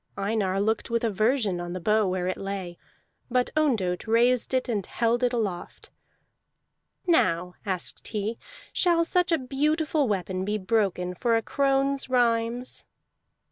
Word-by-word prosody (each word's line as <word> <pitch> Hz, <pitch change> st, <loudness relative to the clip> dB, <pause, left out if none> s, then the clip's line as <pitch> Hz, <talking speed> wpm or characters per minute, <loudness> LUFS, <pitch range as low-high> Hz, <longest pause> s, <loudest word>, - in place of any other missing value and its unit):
Einar 195 Hz, -2 st, 0 dB
looked 220 Hz, +3 st, 0 dB
with 235 Hz, 0 st, 0 dB
aversion 215 Hz, -3 st, +1 dB
on 175 Hz, 0 st, -5 dB
the 185 Hz, -, -4 dB
bow 215 Hz, +3 st, +2 dB
where 185 Hz, -1 st, -1 dB
it 185 Hz, -, -1 dB
lay, 195 Hz, -3 st, -5 dB, 0.5 s
but 250 Hz, 0 st, +1 dB
Ondott 225 Hz, -13 st, +1 dB
raised 240 Hz, +2 st, +3 dB
it 260 Hz, -1 st, 0 dB
and 215 Hz, -5 st, -1 dB
held 235 Hz, +5 st, 0 dB
it 250 Hz, -1 st, +2 dB
aloft. 210 Hz, -8 st, -4 dB, 1.1 s
"Now," 180 Hz, -, +2 dB
asked 185 Hz, -3 st, -3 dB
he, 215 Hz, +1 st, -2 dB, 0.4 s
"shall 340 Hz, -2 st, +3 dB
such 360 Hz, +1 st, +1 dB
a 330 Hz, -, +4 dB
beautiful 295 Hz, +2 st, 0 dB
weapon 185 Hz, -2 st, -2 dB
be 210 Hz, +2 st, -1 dB
broken 190 Hz, -3 st, 0 dB
for 230 Hz, +5 st, +1 dB
a 225 Hz, -, -2 dB
crone's 275 Hz, 0 st, +1 dB
rhymes?" 240 Hz, 0 st, 0 dB
225 Hz, 140 wpm, -26 LUFS, 190-255 Hz, 1.1 s, a